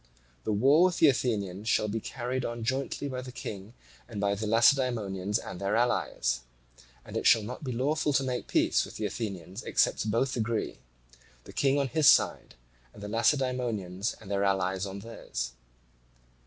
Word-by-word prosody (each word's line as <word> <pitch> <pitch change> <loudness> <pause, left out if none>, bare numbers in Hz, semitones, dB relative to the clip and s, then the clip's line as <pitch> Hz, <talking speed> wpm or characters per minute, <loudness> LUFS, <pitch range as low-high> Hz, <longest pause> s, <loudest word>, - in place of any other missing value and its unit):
The - - 0
war 135 - +5
with 180 -2 +1
the 160 - +6
Athenians 105 -5 -1
shall 110 - +2
be 110 +2 -2
carried 125 +3 -4
on 120 -1 -4
jointly 135 +3 -2
by 130 -2 -4
the 130 0 -8
King 105 -2 -7 0.3
and 110 -3 -6
by 100 0 +1
the 105 +2 -3
Lacedaemonians 110 -4 +2
and 90 - -7
their 100 +1 0
allies: 110 - +1 0.7
and - - -10
it - - +1
shall 115 -2 +6
not 125 +7 -7
be 130 - -3
lawful 145 +5 0
to 135 - +3
make 125 -2 -3
peace - - +2
with - - -9
the 110 - -2
Athenians 100 -2 -5
except 110 - +1
both 125 +4 +1
agree, 115 -1 -2 0.6
the - - -12
King 140 0 +2
on 140 -1 +1
his 150 +3 +5
side - - +3 0.4
and 100 - -11
the - - -4
Lacedaemonians 115 -6 0
and 100 -2 -10
their 100 0 +1
allies 95 0 0
on 100 +1 -7
theirs. - - -5
115 Hz, 175 wpm, -29 LUFS, 100-130 Hz, 0.7 s, the